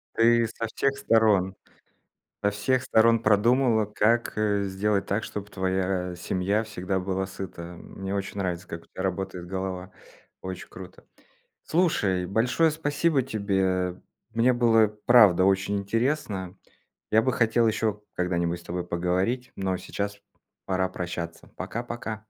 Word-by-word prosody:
Ты 115 0 +4
со 115 +1 -4
всех 140 0 0
сторон 105 -6 +3 0.9
со 100 - +4
всех 125 +6 0
сторон 115 -2 +4
продумала, 115 +2 +3
как, 110 +3 +1
э, 105 -2 +1
сделать 100 +1 0
так, 100 +3 0
чтоб 105 -1 -6
твоя 95 -2 -1
семья 95 +4 0
всегда 95 -3 -3
была 95 +1 -2
сыта. 95 -2 -7 0.2
Мне 95 +1 -5
очень 100 +1 -4
нравится, 90 -2 -2
как 85 -1 -7
у - - -22
тя - - -8
работает 95 -1 -3
голова. 95 0 -4 0.5
Очень 95 -1 -6
круто. 90 -1 -12 0.6
Слушай, 100 - +1
большое 125 - +2
спасибо 145 -1 +1
тебе. 95 -5 -1 0.3
Мне 120 +2 +4
было, 115 -3 +4 0.2
правда, 105 -7 +7
очень 95 +1 +2
интересно. 100 -3 -1 0.6
Я 110 - +5
бы 130 +1 +1
хотел 115 0 +3
еще 110 -1 -1
когда-нибудь 85 -1 0
с 85 - -16
тобой 90 0 -3
поговорить, 95 +9 -1
но 95 -1 -1
сейчас 100 +2 -4 0.5
пора 95 0 0
прощаться. 85 -2 -6
Пока-пока. 120 -1 -4
100 Hz, 135 wpm, -26 LUFS, 95-115 Hz, 0.9 s, правда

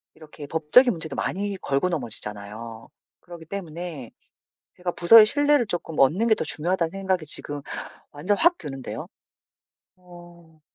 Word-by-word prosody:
이렇게 155 -2 -12
법적인 165 - +4
문제도 160 -5 -6
많이 200 +1 -2
걸고 140 +6 0
넘어지잖아요. 110 - -6 0.3
그러기 170 -2 -12
때문에 165 - -7 0.7
제가 180 0 -3
부서의 215 +6 +8
신뢰를 290 0 +2
조금 170 -3 -4
얻는 170 - +3
게 220 - +4
더 - - -3
중요하다는 170 +1 +1
생각이 190 -4 -2
지금 145 -1 -2 0.5
완전 180 +8 -1
확 345 - +3
드는데요. 135 -3 -7 0.9
어 175 -3 -17
170 Hz, 320 characters per minute, -24 LUFS, 145-195 Hz, 0.9 s, 부서의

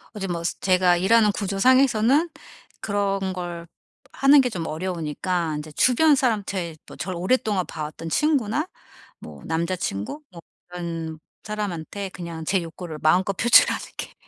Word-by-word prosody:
어 210 - -6
제 195 - -3
뭐 170 -2 -3 0.2
제가 185 -1 +4
일하는 210 +3 +4
구조상에서는 255 - +3 0.5
그런 195 -2 -1
걸 175 -2 -6 0.5
하는 275 +1 +6
게 250 - 0
좀 175 -7 -4
어려우니까 165 -1 -2
이제 155 0 -9
주변 290 - +4
사람한테 200 - -1
또 - - -12
저를 180 0 -5
오랫동안 205 -2 +1
봐왔던 155 +1 -7
친구나 295 - +1 0.5
뭐 - - -11
남자친구 170 - -3
뭐 170 - -11 0.3
그런 165 -3 -5 0.2
사람한테 200 -2 -4
그냥 170 -3 -7
제 190 +1 +1
욕구를 165 -1 -8
마음껏 185 +5 +2
표출하는 235 +4 +5
게 - - -6
185 Hz, 305 characters per minute, -24 LUFS, 170-215 Hz, 0.5 s, 하는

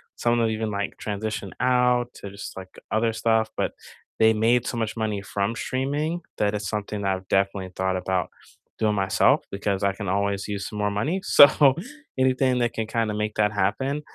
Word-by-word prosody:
some 120 0 +1
of 120 - +2
them 115 -1 +2
even, 110 -1 -2
like, 100 0 -3
transition 105 -1 -4
out 125 -1 +2
to 100 - -8
just, 100 +1 -8
like, 95 -1 -8 0.2
other 115 +1 +2
stuff. 110 0 +1
But - - -1 0.5
they 110 0 +6
made 115 +3 +2
so 120 - -3
much 110 -1 -2
money 105 -3 -2
from 100 +2 -2
streaming 145 +8 -2 0.2
that 105 0 +1
it's 105 -2 -3
something 105 -1 -3
that 95 -1 +1
I've 95 0 -10
definitely 95 -1 0
thought 95 0 0
about 90 0 -1 0.5
doing 105 -1 +2
myself 95 -1 +3
because 100 0 -2
I 100 -1 +2
can 100 0 -6
always 100 0 0
use 100 -1 -4
some 105 - -6
more 105 0 +1
money, 150 - -1
so 140 -1 +7 0.4
anything 130 -1 +2
that 120 -1 0
can 110 -1 -3
kinda 110 -1 -1
make 105 0 -2
that 105 -1 +2
happen. 130 +9 0
105 Hz, 195 wpm, -24 LUFS, 100-120 Hz, 0.5 s, so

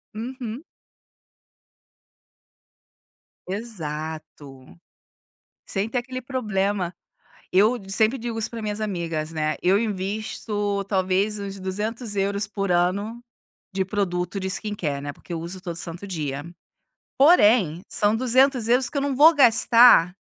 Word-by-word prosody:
Uhum. 245 +3 -6 2.9
Exato, 155 - -7 0.9
sem 200 +2 -2
ter 245 - 0
aquele 255 +1 -6
problema. 205 -7 -1 0.6
Eu 215 +6 +4
sempre 220 +6 +1
digo 230 -1 -4
isso 220 - -2
para 230 -2 -6
minhas 210 0 -3
amigas, 165 -6 -3
né, 155 -1 -1
eu 190 +3 +4
invisto 205 0 -2
talvez 195 +2 +1
uns 200 -1 -6
200€ 205 0 -2
por 195 -2 -3
ano 200 +7 0 0.5
de 190 0 0
produto 190 -1 -2
de 190 - -3
skincare, 185 -9 -3
né, 145 0 -5
porque 175 - -10
eu 165 - -3
uso 180 +3 -7
todo 170 -3 -5
santo 170 +3 -7
dia. 145 -5 -4 0.7
Porém, 215 - +5
são 210 +1 +1
200€ 255 0 +3
que - - -8
eu - - 0
não 280 -1 -1
vou 315 +5 +7
gastar 235 - +6
205 Hz, 120 wpm, -24 LUFS, 180-230 Hz, 2.9 s, vou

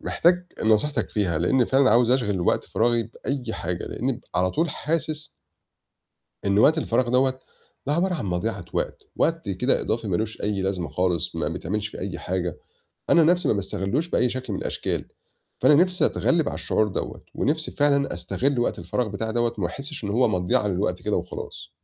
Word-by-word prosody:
محتاج 180 +1 +2 0.2
نصيحتك 110 +7 +2
فيها 90 -7 0
لإني 120 +9 +3
فعلًا 135 0 +4
عاوز 120 +2 +4
أشغِل 105 -8 +1
وقت 85 - +1
فراغي 120 0 +1
بأي 125 +3 -5
حاجة، 90 +1 -3
لإني 130 0 -2
على 90 +1 +2
طول 165 +1 0
حاسس 155 0 -2 1.2
إن 100 +1 +3
وقت 155 +9 +5
الفراغ 120 -4 +1
دوّة 130 +1 +2 0.5
ده 145 - +1
عبارة 180 +3 +1
عن 125 - -3
مضيعة 90 +2 -2
وقت، - - -2
وقت 165 -8 0
كده 125 +8 +1
إضافي 115 -2 -2
ما 90 - +1
لوش 110 +2 -3
أي 100 -2 -1
لازمة 95 -4 -1
خالص 90 0 0
ما 75 -2 0
بيتعملش 100 +6 -3
فيه - - -10
أي 95 0 -4
حاجة، 90 -2 -2 0.5
أنا 170 - +7
نَفْسي 175 +2 +3
ما - - +3
باستغلّوش 100 - -1
بأي 125 - +2
شكل 130 -2 -4
من 95 - -2
الأشكال، - - -2 0.6
فأنا 150 - +6
نِفسي 180 +4 +4
أتغلّب 165 -3 +1
على - - -4
الشعور 110 -1 +1
دوّة 95 - -5
ونِفْسي 155 +2 0
فعلًا 140 -1 +2
أستغل 135 0 -1
وقت 120 - 0
الفراغ 100 +7 -1
بتاعي 110 +2 -3
دوّة 120 0 +1
وما 95 - +1
أحسش 140 - -7
إن 100 - -2
هو 120 +3 +3
مضيعة 90 +1 +1
للوقت 90 -1 -1
كده 105 - 0
وخلاص. 90 0 -6
115 Hz, 180 wpm, -25 LUFS, 95-140 Hz, 1.2 s, أنا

